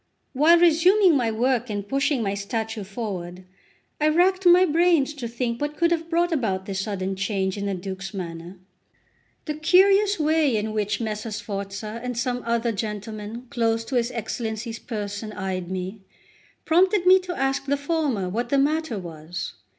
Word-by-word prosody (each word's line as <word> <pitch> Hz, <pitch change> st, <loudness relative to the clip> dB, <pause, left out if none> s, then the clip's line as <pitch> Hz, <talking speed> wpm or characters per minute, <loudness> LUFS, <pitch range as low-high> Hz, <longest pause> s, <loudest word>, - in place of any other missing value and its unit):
While 310 Hz, +6 st, +6 dB
resuming 350 Hz, +2 st, +5 dB
my 245 Hz, -4 st, +1 dB
work 240 Hz, +2 st, 0 dB
and 205 Hz, -1 st, -4 dB
pushing 275 Hz, 0 st, +1 dB
my 195 Hz, -1 st, -1 dB
statue 220 Hz, +2 st, -3 dB
forward, 185 Hz, -4 st, -6 dB, 0.6 s
I 305 Hz, -, +3 dB
racked 365 Hz, +3 st, +3 dB
my 355 Hz, +1 st, +7 dB
brains 330 Hz, -3 st, +3 dB
to 265 Hz, -5 st, -5 dB
think 235 Hz, +1 st, -3 dB
what 295 Hz, +1 st, -3 dB
could 340 Hz, 0 st, +2 dB
have 330 Hz, -1 st, -1 dB
brought 345 Hz, +1 st, +1 dB
about 205 Hz, -, -1 dB
this 195 Hz, -1 st, -3 dB
sudden 195 Hz, -1 st, -3 dB
change 190 Hz, -1 st, -1 dB
in 200 Hz, -1 st, -3 dB
the 195 Hz, -, -1 dB
Duke's 190 Hz, +1 st, -6 dB
manner. 175 Hz, -1 st, -7 dB, 0.9 s
The 305 Hz, -, -2 dB
curious 390 Hz, +5 st, +4 dB
way 305 Hz, -5 st, +2 dB
in 215 Hz, +1 st, -2 dB
which 210 Hz, 0 st, -1 dB
Messer 215 Hz, 0 st, -3 dB
Sforza 205 Hz, +1 st, -5 dB
and 250 Hz, -2 st, -4 dB
some 245 Hz, +1 st, -1 dB
other 235 Hz, 0 st, +1 dB
gentlemen 215 Hz, +2 st, -5 dB
close 230 Hz, -3 st, 0 dB
to 265 Hz, -, -4 dB
his 240 Hz, -1 st, +2 dB
Excellency's 225 Hz, -1 st, -4 dB
person 210 Hz, -1 st, -5 dB
eyed 185 Hz, -3 st, -4 dB
me, 190 Hz, +2 st, -5 dB, 0.6 s
prompted 365 Hz, +3 st, +3 dB
me 375 Hz, +1 st, +7 dB
to 365 Hz, -1 st, -6 dB
ask 270 Hz, 0 st, 0 dB
the 285 Hz, +1 st, +1 dB
former 285 Hz, -, -1 dB
what 235 Hz, +6 st, -2 dB
the 280 Hz, -, +2 dB
matter 295 Hz, -3 st, +1 dB
was. 170 Hz, -2 st, -6 dB
230 Hz, 165 wpm, -24 LUFS, 200-305 Hz, 0.9 s, my